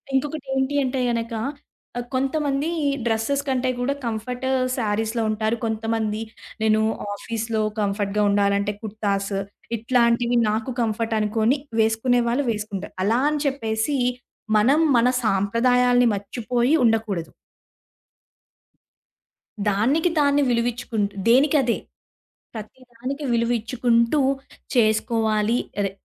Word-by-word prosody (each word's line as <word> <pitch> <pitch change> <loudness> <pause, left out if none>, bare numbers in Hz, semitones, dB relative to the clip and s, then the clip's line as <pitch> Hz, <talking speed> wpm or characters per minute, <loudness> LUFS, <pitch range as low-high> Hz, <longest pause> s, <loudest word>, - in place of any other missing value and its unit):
ఇంకొకటేంటి 270 -1 -1
అంటే 260 0 -1
గనక 230 0 -2 0.6
ఆహ్, 245 - -3
కొంతమంది 275 +2 0 0.4
డ్రెసెస్ 230 +5 0
కంటే 260 -1 0
కూడా, 255 +3 0
కంఫర్ట్ 235 +3 -4 0.3
శారీస్‌లో 220 0 -1
ఉంటారు. 215 +1 0
కొంతమంది 220 -1 -1 0.4
నేను 215 0 +3 0.3
ఆఫీస్‌లో 225 +1 -3 0.2
కంఫర్ట్‌గా 205 0 0
ఉండాలంటే, 200 0 +1
కుర్తాస్ 205 -2 -2 0.4
ఇట్లాంటివి 235 +1 +2
నాకు 225 +5 -2
కంఫర్ట్ 225 0 -1
అనుకోని, 220 +5 +1 0.2
వేసుకునే 225 +3 +2
వాళ్ళు 250 +4 0
వేసుకుంటారు. 210 -3 -5
అలా 225 +5 +2
అని 300 -1 -1
చెప్పేసి, 245 0 -1 0.6
మనం 260 +8 +4 0.2
మన 235 +1 +4 0.2
సాంప్రదాయాల్ని 245 +5 +3
మర్చిపోయి 240 +6 0
ఉండకూడదు. 220 -7 0 2.4
దానికి 260 - +2
దాన్ని 285 0 +3
విలువిచ్చుకుంటూ 235 -3 -1
దేనికి 270 +6 +5
అదే. 235 -2 +1 0.8
ప్రతి 220 +4 -9
దానికి 270 +5 -5
విలువిచ్చుకుంటూ 235 +2 +1 0.6
చేసుకోవాలి. 220 0 +2 0.2
అదే, 200 -1 0
230 Hz, 95 wpm, -23 LUFS, 215-250 Hz, 2.4 s, దేనికి